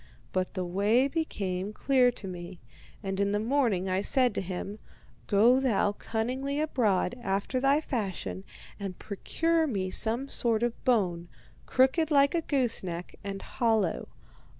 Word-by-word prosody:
But 185 +1 -2
the 185 -1 -2
way 205 +9 +2
became 205 - -3
clear 255 +1 +3
to 195 - -6
me, 175 0 -8 0.4
and 195 0 -3
in 200 0 +1
the 205 - +1
morning 225 -6 +1
I 185 +1 0
said 250 +1 +3
to - - -2
him: 190 +3 -5 0.5
'Go 230 +6 +5
thou 225 -6 +2
cunningly 255 +7 -3
abroad, 240 -11 +1
after 200 +5 -1
thy 275 +3 +3
fashion, 190 - -3 0.4
and 195 -3 -5
procure 325 - 0
me 190 -7 -2
some 235 +7 +2
sort 230 -4 0
of 240 -1 -2
bone, 180 -8 +1 0.4
crooked 265 +5 +3
like 280 -2 +4
a 340 - +1
goose 265 -7 0
neck, 175 -1 -6
and 195 -1 -5
hollow. 220 -7 0
220 Hz, 150 wpm, -29 LUFS, 190-260 Hz, 0.5 s, Go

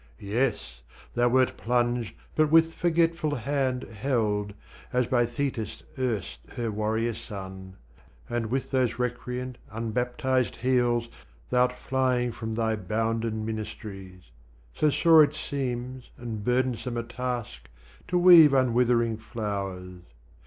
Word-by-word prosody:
Yes 100 - -2 0.3
thou 120 0 +3
wert 130 +1 +2
plunged 120 -1 0 0.2
but 155 -1 +3
with 165 +1 +5
forgetful 165 -2 +1
hand 130 0 -1
Held, 105 -3 -1 0.4
as 125 0 +2
by 120 0 +2
Thetis 120 -2 -3
erst 110 - -2 0.2
her 115 -2 -2
warrior 110 +2 -1
son: 95 -2 -8 0.5
And 120 -1 -2
with 130 +4 -2
those 130 -3 +1
recreant 125 +1 -3
unbaptized 125 +3 -1
heels 120 -1 +1 0.4
Thou'rt 125 0 +3
flying 125 -1 0
from 110 -1 -5
thy 110 -1 +1
bounden 110 +2 -2
minist'ries 100 - -7 0.4
So 155 - +2
sore 160 +1 +6
it 150 0 0
seems 130 -3 -4
and 115 -3 -6
burthensome 125 0 0
a 115 - -1
task 120 -1 -5 0.4
To 180 - +1
weave 170 -5 +8
unwithering 120 -3 +2
flowers! 100 -5 -5
120 Hz, 115 wpm, -27 LUFS, 110-130 Hz, 0.5 s, weave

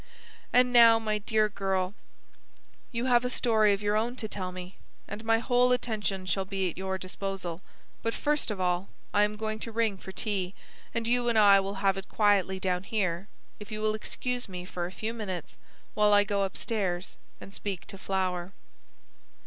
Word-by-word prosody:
And 250 0 +4
now, 230 -1 +8
my 215 -1 -1
dear 215 +1 +2
girl, 195 -2 -1 1.0
you 235 0 -2
have 245 -2 +4
a 250 - 0
story 220 -4 +3
of 200 +1 -1
your 205 0 +1
own 230 +3 0
to 230 -4 -4
tell 185 -3 -4
me, 180 +1 -9 0.3
and 210 +2 -7
my 225 0 +3
whole 245 +2 +3
attention 215 -6 -1
shall 190 +2 0
be 190 -1 -1
at - - -14
your 190 +1 -2
disposal. 185 -2 -5 0.4
But 230 0 -1
first 295 -2 +1
of 210 -3 -3
all 180 +1 0 0.2
I 205 - +4
am 210 0 +2
going 215 0 -3
to 230 - -4
ring 220 -3 0
for 190 - -8
tea, 190 -2 -2 0.4
and 230 -1 -2
you 240 +1 +2
and 230 - +2
I 200 -2 +8
will 195 +1 -3
have 195 0 +4
it 195 - -11
quietly 200 -3 +2
down 180 -1 0
here, 190 -2 -1 0.3
if 210 0 -10
you 215 - -3
will 215 0 +1
excuse 245 +2 -3
me 180 -1 -6
for 175 -1 -4
a - - -9
few 220 +4 -4
minutes 185 -10 -5 0.4
while 210 0 +4
I 205 0 +6
go 200 -1 0
upstairs 190 -3 -2 0.2
and 195 - -11
speak 195 -4 -4
to 195 - -10
Flower." 185 -1 -2
205 Hz, 190 wpm, -29 LUFS, 190-225 Hz, 1.0 s, now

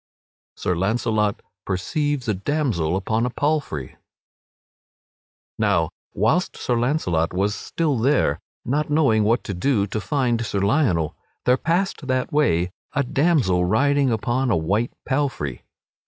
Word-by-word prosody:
[Sidenote: - - -13
Sir - - -4
Launcelot 105 +1 0 0.2
perceives 145 - -1
a 110 - +2
damsel 100 - 0
upon 110 +4 0
a 125 - +1
palfrey] 140 - -2 1.6
Now - - +2 0.3
whilst 115 - +1
Sir 125 - -1
Launcelot 115 - 0
was 100 +2 +1
still 150 +1 -1
there, 130 - +2 0.3
not 150 +5 0
knowing 140 -8 +3
what 115 +3 +2
to 100 - -4
do 100 +2 +1
to 105 +1 -4
find 125 -3 0
Sir 100 -3 -2
Lionel, 100 - +1 0.3
there 125 - +5
passed 170 +1 -1
that 130 +1 -1
way 90 - +2 0.2
a 140 - +1
damsel 130 - +2
riding 140 +7 +2
upon 120 +4 0
a 110 - +3
white 100 +9 0 0.2
palfrey. 130 - -1
120 Hz, 135 wpm, -23 LUFS, 100-145 Hz, 1.6 s, there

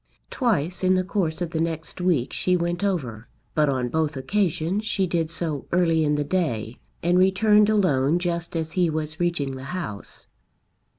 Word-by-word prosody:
Twice 185 - 0
in 185 0 +4
the 185 - +2
course 180 -3 -1
of 165 - -5
the 160 -2 -1
next 165 +1 -3
week 165 -9 +1
she 180 0 +1
went 175 +2 -2
over, 125 - -2 0.3
but 150 -2 +2
on 130 -2 0
both 155 0 -1
occasions 180 +5 0
she 200 -3 0
did 165 -3 -1
so 160 -4 -3
early 165 -2 +3
in 150 -1 +2
the 145 - 0
day, 140 -9 -2 0.2
and 175 +2 +3
returned 210 +3 +4
alone 165 -8 +3
just 170 -1 -2
as 160 -1 -2
he 180 -1 +2
was 155 0 -3
reaching 170 -6 -1
the 130 - -8
house. 105 - -7
170 Hz, 175 wpm, -24 LUFS, 150-185 Hz, 0.3 s, in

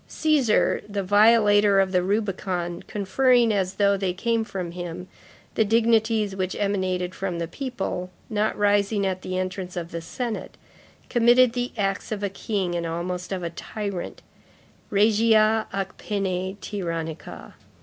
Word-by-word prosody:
Cæsar, 295 -8 +2
the 200 -1 -2
violator 205 0 +5
of 190 -1 +2
the 180 -1 +3
Rubicon, 185 -3 -2
conferring, 235 +3 +3
as 190 -2 -1
though 200 -1 +3
they 190 -2 -1
came 230 +4 0
from 185 -5 -5
him, 175 +1 -6 0.5
the 220 - +3
dignities 220 -2 +2
which 185 -1 -2
emanated 185 -3 -1
from 185 -2 -3
the 170 0 -3
people, 195 -5 -4 0.2
not 215 0 -1
rising 205 0 +2
at 185 -1 -2
the 185 0 -4
entrance 185 0 -4
of 170 -1 -5
the 170 - -4
senate, 230 +7 -5 0.5
committed 240 0 +5
the 245 0 -2
acts 195 0 -1
of 205 -1 -3
a 200 - 0
king 195 -2 -2
and 170 -1 -2
almost 180 +2 -4
of 185 -2 -3
a 170 - -3
tyrant, 200 +1 -6 0.7
regia 215 +1 +3
ac 195 -1 -2
pene 190 -2 -2
tyrannica. 165 -6 -5
200 Hz, 145 wpm, -24 LUFS, 180-215 Hz, 0.7 s, violator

